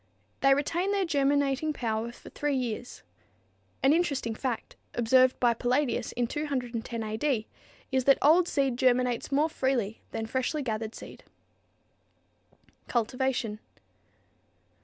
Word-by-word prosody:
They 275 0 +5
retain 340 +7 0
their 400 -2 +1
germinating 285 -1 +1
power 230 -3 -2
for - - -14
three 295 -1 -1
years. 245 -1 -4 0.8
An 270 +2 +6
interesting 280 -9 0
fact, 240 +1 -4 0.2
observed 255 +2 +4
by 240 -1 +4
Palladius 250 +4 0
in 245 - 0
210 245 -5 -3
A. 215 0 -3
D., 245 -4 0 0.5
is 260 -1 +1
that 275 - +6
old 335 +5 +5
seed 275 -6 0
germinates 250 -1 +2
more 290 +3 +3
freely 255 -8 -1
than 225 0 -4
freshly 260 +5 -1
gathered 220 -2 -3
seed. - - -11 1.7
_Cultivation. 240 -2 -1
255 Hz, 120 wpm, -28 LUFS, 235-285 Hz, 1.7 s, An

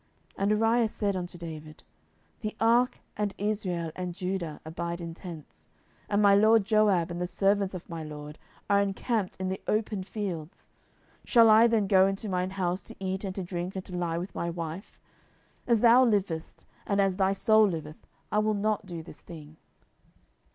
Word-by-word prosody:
10:011:011 - - -30
And 200 +1 +2
Uriah 225 +2 +3
said 205 -2 -2
unto 175 -1 -5
David, 155 -2 -9 0.6
The 215 0 -4
ark, 240 +3 +3
and 205 -1 -2
Israel, 190 -6 -2
and 180 -1 -4
Judah, 180 -4 -3
abide 170 +2 -4
in 170 -1 -6
tents; 155 - -11 0.4
and 205 0 +2
my 200 -1 +7
lord 215 +1 +5
Joab, 205 -5 +3
and 175 +1 -4
the 180 - -1
servants 195 0 +1
of 180 - -8
my 165 -1 -6
lord, 150 0 -9 0.3
are 200 0 +4
encamped 200 +1 -1
in 185 0 -2
the 190 - -4
open 215 -2 0
fields; 185 -5 -6 0.5
shall 230 -3 +6
I 225 +2 +7
then 225 -3 +2
go 190 -1 +5
into 195 +2 -3
mine 185 -1 -1
house, 180 0 -1
to - - -9
eat 190 0 -3
and 190 -2 -4
to 195 - -3
drink, 175 +1 -4
and 190 - -5
to 180 - -7
lie 170 -2 -1
with 180 +3 -5
my 170 - -2
wife? 170 +2 -6 0.7
as 235 -3 +3
thou 240 +2 +7
livest, 195 -8 -1 0.2
and 200 0 +1
as 195 -2 +2
thy 195 0 +2
soul 215 +2 +4
liveth, 155 -4 -6 0.2
I 210 - +2
will 215 0 +1
not 210 0 -1
do 170 -3 -6
this 170 - -13
thing. 155 -2 -12
190 Hz, 185 wpm, -28 LUFS, 170-210 Hz, 0.7 s, my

